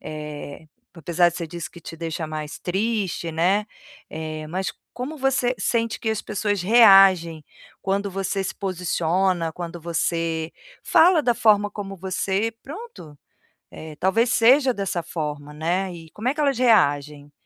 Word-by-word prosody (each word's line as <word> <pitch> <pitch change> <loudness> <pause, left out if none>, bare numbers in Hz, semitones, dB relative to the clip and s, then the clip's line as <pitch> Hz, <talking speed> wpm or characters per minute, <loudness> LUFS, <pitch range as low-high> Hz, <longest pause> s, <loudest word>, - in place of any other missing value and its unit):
eh, 150 -1 -8 0.3
apesar 175 +1 +2
que 170 - -9
você 170 -2 -4
disse 170 +1 -7
que 170 - -13
te 165 - -9
deixa 165 -1 -4
mais 155 +2 -6
triste, 195 -2 -2
né. 185 +6 +1 0.4
Eh, 155 -1 -6
mas 180 -1 -3 0.2
como 285 +5 -6
você 260 -2 +1
sente 230 -1 -1
que 225 - -2
as 220 - -2
pessoas 205 -2 -2
reagem 195 -7 +6 0.4
quando 200 +1 -1
você 195 +1 -2
se 190 - -4
posiciona, 180 -2 -1
quando 175 +1 -7
você 165 -1 -1 0.3
fala 335 -1 +5
da 240 -3 +2
forma 205 -2 +3
como 195 -1 -7
você, 190 +4 -1
pronto, 295 - -10 0.5
eh, 155 -1 -9
talvez 225 +6 +2
seja 255 +3 +5
dessa 195 -4 -3
forma, 150 -3 -5
né, 175 +4 -1
e 165 -1 -11
como 220 +4 -5
é - - 0
que 300 - -10
elas 280 -4 +1
reagem? 145 - +2
185 Hz, 150 wpm, -23 LUFS, 160-215 Hz, 0.5 s, reagem